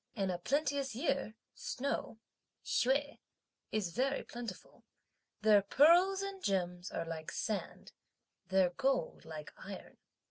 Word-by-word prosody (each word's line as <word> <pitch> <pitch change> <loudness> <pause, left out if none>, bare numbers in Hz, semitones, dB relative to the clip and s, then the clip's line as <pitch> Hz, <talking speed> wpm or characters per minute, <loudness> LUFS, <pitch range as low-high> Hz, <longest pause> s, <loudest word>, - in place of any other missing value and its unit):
In 195 -2 0
a 175 - -3
plenteous 280 - 0
year, 275 -4 -1 0.2
snow, 255 -3 -3 0.5
(Hsüeh,) 280 +3 +1 0.5
is 205 -5 -1
very 270 +7 0
plentiful; 235 -5 -8 0.6
their 210 -2 +7
pearls 350 - +5
and 395 -1 -5
gems 180 -2 0
are 165 - -3
like 160 -1 -5
sand, 215 -2 -3 0.6
their 190 -2 +3
gold 260 -4 0
like 155 -2 -8
iron. - - -9
225 Hz, 115 wpm, -34 LUFS, 185-280 Hz, 0.6 s, their